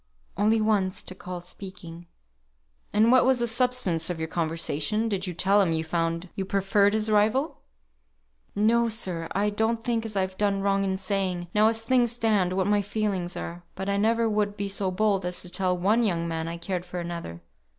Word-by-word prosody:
"Only 215 Hz, +3 st, +3 dB
once 200 Hz, -3 st, +1 dB
to -, -, -7 dB
call 180 Hz, -1 st, -7 dB
speaking." 175 Hz, -2 st, -9 dB, 0.8 s
"And 220 Hz, +3 st, +4 dB
what 255 Hz, 0 st, +6 dB
was 260 Hz, 0 st, +3 dB
the 240 Hz, -, +1 dB
substance 235 Hz, -9 st, +1 dB
of 175 Hz, -, -2 dB
your 160 Hz, 0 st, -3 dB
conversation? 165 Hz, +6 st, -1 dB
Did 195 Hz, -3 st, -2 dB
you 180 Hz, -, -5 dB
tell 195 Hz, +4 st, +4 dB
him 175 Hz, -4 st, +1 dB
you 160 Hz, 0 st, 0 dB
found 165 Hz, +1 st, -2 dB
you 195 Hz, -, -3 dB
preferred 200 Hz, +1 st, +2 dB
his 220 Hz, 0 st, 0 dB
rival?" 220 Hz, +8 st, +2 dB, 1.0 s
"No, 230 Hz, +3 st, +3 dB
sir. 180 Hz, -7 st, -2 dB
I 205 Hz, +2 st, +1 dB
don't 225 Hz, +2 st, 0 dB
think 230 Hz, -1 st, 0 dB
as 220 Hz, -2 st, -6 dB
I've 190 Hz, -1 st, -2 dB
done 200 Hz, -1 st, +1 dB
wrong 195 Hz, 0 st, +1 dB
in 190 Hz, -1 st, -1 dB
saying, 185 Hz, -2 st, -2 dB
now 215 Hz, +1 st, +5 dB
as 225 Hz, 0 st, 0 dB
things 245 Hz, -1 st, +2 dB
stand, 210 Hz, -6 st, +1 dB
what 190 Hz, 0 st, +1 dB
my 205 Hz, +1 st, +2 dB
feelings 200 Hz, -3 st, -2 dB
are; 170 Hz, +1 st, -6 dB
but 190 Hz, +1 st, -4 dB
I 200 Hz, -, +1 dB
never 225 Hz, +2 st, +2 dB
would 210 Hz, -1 st, 0 dB
be 200 Hz, -1 st, -2 dB
so 195 Hz, -1 st, 0 dB
bold 195 Hz, +1 st, +1 dB
as 180 Hz, 0 st, -2 dB
to 180 Hz, -, -9 dB
tell 180 Hz, 0 st, 0 dB
one 205 Hz, +6 st, +2 dB
young 170 Hz, -7 st, 0 dB
man 165 Hz, -1 st, -3 dB
I 170 Hz, +1 st, -4 dB
cared 175 Hz, +1 st, -3 dB
for 180 Hz, 0 st, -6 dB
another. 170 Hz, -, -6 dB
195 Hz, 200 wpm, -26 LUFS, 180-215 Hz, 1.0 s, what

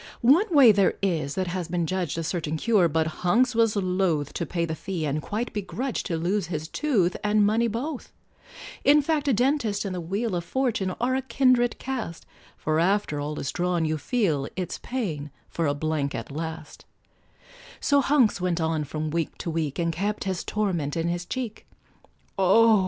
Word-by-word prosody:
One 305 Hz, -, +5 dB
way 280 Hz, -9 st, +8 dB
there 200 Hz, -2 st, +3 dB
is, 155 Hz, -7 st, 0 dB
that 185 Hz, -, 0 dB
has 180 Hz, -1 st, -3 dB
been 175 Hz, -1 st, -1 dB
judged 175 Hz, -3 st, -2 dB
A 165 Hz, -, -2 dB
certain 160 Hz, -2 st, -2 dB
cure, 205 Hz, -1 st, +3 dB
but 160 Hz, 0 st, +1 dB, 0.2 s
Hunks 235 Hz, +9 st, +3 dB
was 225 Hz, -2 st, +3 dB
loth 180 Hz, -6 st, 0 dB
To 170 Hz, -, -3 dB
pay 170 Hz, -2 st, -1 dB
the 160 Hz, -, -3 dB
fee, 175 Hz, -1 st, -4 dB
and 150 Hz, +1 st, -1 dB
quite 220 Hz, +8 st, -3 dB
begrudged 235 Hz, +5 st, -3 dB
To 170 Hz, -5 st, -1 dB
lose 180 Hz, +3 st, 0 dB
his 155 Hz, -2 st, -4 dB
tooth 200 Hz, -, +1 dB
and 210 Hz, 0 st, +3 dB
money 225 Hz, +3 st, +2 dB
both; 250 Hz, +6 st, -4 dB, 0.7 s
In 295 Hz, +1 st, +6 dB
fact, 295 Hz, -1 st, 0 dB
a 275 Hz, -, +4 dB
dentist 235 Hz, -4 st, +1 dB
and 195 Hz, -, -3 dB
the 180 Hz, -, -3 dB
wheel 195 Hz, +5 st, -2 dB
Of 170 Hz, -, -2 dB
Fortune 215 Hz, -5 st, -1 dB
are 250 Hz, +2 st, +1 dB
a 265 Hz, -, +1 dB
kindred 250 Hz, -1 st, +2 dB
cast, 240 Hz, -11 st, -5 dB, 0.3 s
For 155 Hz, 0 st, 0 dB
after 185 Hz, -4 st, +1 dB
all 150 Hz, +1 st, -4 dB
is 135 Hz, -, -3 dB
drawn, 175 Hz, -2 st, 0 dB
you 155 Hz, 0 st, -1 dB
feel 160 Hz, -, 0 dB
It's 185 Hz, -2 st, -4 dB
paying 170 Hz, -, -3 dB, 0.2 s
for 165 Hz, -2 st, -1 dB
a 145 Hz, -, +1 dB
blank 145 Hz, -1 st, -1 dB
at 115 Hz, +3 st, -6 dB
last; 160 Hz, +1 st, -6 dB, 0.9 s
So 285 Hz, -1 st, +3 dB
Hunks 255 Hz, -8 st, +3 dB
went 180 Hz, -2 st, 0 dB
on 160 Hz, -1 st, 0 dB
from 155 Hz, +2 st, -4 dB
week 165 Hz, -1 st, -2 dB
to 170 Hz, -, -4 dB
week, 155 Hz, -4 st, -2 dB
And 170 Hz, -1 st, 0 dB
kept 205 Hz, +5 st, -2 dB
his 190 Hz, -2 st, -2 dB
torment 175 Hz, -9 st, -1 dB
in 165 Hz, +1 st, 0 dB
his 175 Hz, 0 st, -3 dB
cheek; 245 Hz, -2 st, -5 dB, 0.7 s
Oh! 215 Hz, +3 st, +6 dB
185 Hz, 190 wpm, -26 LUFS, 160-230 Hz, 0.9 s, way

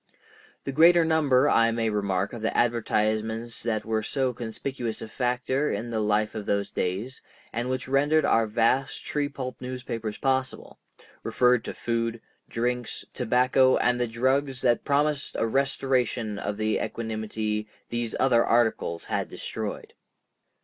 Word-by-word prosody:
The 140 Hz, -, -3 dB
greater 165 Hz, +4 st, +6 dB
number, 145 Hz, -4 st, +3 dB
I 115 Hz, -4 st, +4 dB
may 115 Hz, -1 st, 0 dB
remark, 100 Hz, -2 st, -1 dB
of 120 Hz, -, -6 dB
the 110 Hz, -, -1 dB
advertisements 110 Hz, 0 st, 0 dB
that 110 Hz, -2 st, -1 dB
were 110 Hz, 0 st, 0 dB
so 130 Hz, +3 st, -1 dB
conspicuous 120 Hz, 0 st, -4 dB
a -, -, -6 dB
factor 125 Hz, +4 st, -1 dB
in 120 Hz, +1 st, -3 dB
the 110 Hz, -, -1 dB
life 105 Hz, 0 st, +1 dB
of 110 Hz, -2 st, -6 dB
those 100 Hz, 0 st, 0 dB
days, 100 Hz, +9 st, -3 dB, 0.3 s
and 120 Hz, +2 st, -2 dB
which 130 Hz, 0 st, -2 dB
rendered 145 Hz, +4 st, +3 dB
our 115 Hz, -1 st, +3 dB
vast 115 Hz, +5 st, +1 dB
tree 145 Hz, -1 st, -1 dB
pulp 130 Hz, -3 st, -6 dB
newspapers 125 Hz, -4 st, -5 dB
possible, 130 Hz, -1 st, -2 dB, 0.4 s
referred 125 Hz, -1 st, +2 dB
to -, -, -5 dB
foods, 115 Hz, 0 st, -1 dB, 0.3 s
drinks, 120 Hz, +1 st, -2 dB
tobacco, 125 Hz, +1 st, +3 dB
and 125 Hz, 0 st, +2 dB
the 120 Hz, -, +1 dB
drugs 130 Hz, +3 st, 0 dB
that 120 Hz, -2 st, +3 dB
promised 145 Hz, 0 st, 0 dB
a -, -, +1 dB
restoration 125 Hz, -4 st, 0 dB
of 100 Hz, 0 st, -3 dB
the 110 Hz, 0 st, 0 dB
equanimity 110 Hz, -1 st, -3 dB, 0.2 s
these 120 Hz, -1 st, -2 dB
other 120 Hz, -3 st, +4 dB
articles 110 Hz, -7 st, +1 dB
had -, -, -2 dB
destroyed. -, -, -6 dB
120 Hz, 145 wpm, -26 LUFS, 110-130 Hz, 0.4 s, greater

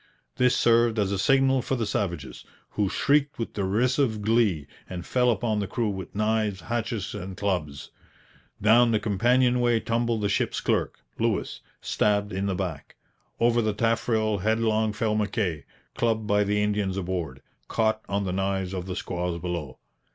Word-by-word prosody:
This 125 Hz, 0 st, +3 dB
served 115 Hz, -1 st, +3 dB
as 100 Hz, -2 st, +1 dB
a 100 Hz, -, -1 dB
signal 135 Hz, +4 st, +3 dB
for 135 Hz, -, -2 dB
the 115 Hz, -3 st, -1 dB
savages, 100 Hz, -3 st, -3 dB, 0.3 s
who 100 Hz, -2 st, 0 dB
shrieked 145 Hz, +3 st, +1 dB
with 115 Hz, -, -4 dB
derisive 110 Hz, +3 st, +1 dB
glee 105 Hz, -9 st, +2 dB, 0.2 s
and 90 Hz, -2 st, -6 dB
fell 125 Hz, -1 st, +2 dB
upon 110 Hz, -1 st, 0 dB
the 100 Hz, -, -2 dB
crew 115 Hz, +2 st, -1 dB
with 95 Hz, -2 st, -6 dB
knives, 105 Hz, -2 st, 0 dB
hatchets, 115 Hz, 0 st, -3 dB
and 95 Hz, -2 st, -6 dB
clubs. 90 Hz, -8 st, -3 dB, 0.7 s
Down 115 Hz, +3 st, +5 dB
the 110 Hz, -, +3 dB
companionway 120 Hz, +3 st, +2 dB
tumbled 115 Hz, 0 st, -1 dB
the 100 Hz, -, +1 dB
ship's 100 Hz, -, 0 dB
clerk, -, -, -1 dB, 0.2 s
Lewis, -, -, -1 dB, 0.2 s
stabbed 100 Hz, -1 st, 0 dB
in 95 Hz, +1 st, -1 dB
the 95 Hz, -, -1 dB
back. 90 Hz, -6 st, -5 dB, 0.4 s
Over 120 Hz, 0 st, +3 dB
the 110 Hz, -2 st, 0 dB
taffrail 110 Hz, -1 st, +1 dB
headlong 110 Hz, +1 st, +1 dB
fell 110 Hz, 0 st, -1 dB
Mackay, 105 Hz, -7 st, -1 dB, 0.3 s
clubbed 110 Hz, -2 st, 0 dB
by 105 Hz, 0 st, +2 dB
the 105 Hz, +1 st, +1 dB
Indians 105 Hz, -2 st, -1 dB
aboard, 85 Hz, -8 st, -4 dB, 0.2 s
caught 110 Hz, -1 st, +1 dB
on 100 Hz, +1 st, 0 dB
the 90 Hz, -2 st, -2 dB
knives 95 Hz, -1 st, -1 dB
of 90 Hz, -1 st, -4 dB
the 90 Hz, -, -4 dB
squaws 90 Hz, -3 st, -3 dB
below. 85 Hz, -6 st, -4 dB
105 Hz, 160 wpm, -26 LUFS, 95-115 Hz, 0.7 s, Down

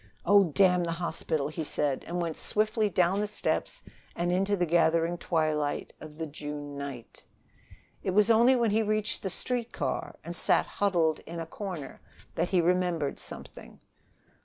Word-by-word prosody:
"Oh, 200 Hz, +1 st, +6 dB
damn 180 Hz, +2 st, +3 dB
the 165 Hz, -, -1 dB
hospital!" 160 Hz, -4 st, -2 dB
he 160 Hz, +1 st, -4 dB
said 145 Hz, -2 st, -1 dB
and 175 Hz, +1 st, -3 dB
went 165 Hz, -2 st, -2 dB
swiftly 215 Hz, 0 st, +1 dB
down 180 Hz, +1 st, +2 dB
the 210 Hz, -, 0 dB
steps 215 Hz, -, -2 dB, 0.3 s
and 175 Hz, +1 st, 0 dB
into 195 Hz, +3 st, +1 dB
the 175 Hz, -, +2 dB
gathering 165 Hz, 0 st, +2 dB
twilight 155 Hz, -4 st, -1 dB
of 155 Hz, -1 st, -10 dB
the 160 Hz, -, -3 dB
June 145 Hz, -1 st, -7 dB
night. 140 Hz, -5 st, -7 dB, 0.8 s
It -, -, -2 dB
was 210 Hz, +4 st, +4 dB
only 235 Hz, +4 st, +6 dB
when 235 Hz, -3 st, +2 dB
he 220 Hz, +2 st, +3 dB
reached 215 Hz, 0 st, 0 dB
the 190 Hz, -, -2 dB
street 240 Hz, +4 st, -1 dB
car, -, -, -3 dB
and -, -, -6 dB
sat -, -, +3 dB
huddled 170 Hz, -6 st, +1 dB
in 170 Hz, +1 st, -6 dB
a 165 Hz, -, -3 dB
corner, 170 Hz, -5 st, -7 dB, 0.3 s
that 170 Hz, +2 st, -1 dB
he 185 Hz, -2 st, +3 dB
remembered 175 Hz, -4 st, 0 dB
something. -, -, -10 dB
175 Hz, 165 wpm, -29 LUFS, 155-205 Hz, 0.8 s, Oh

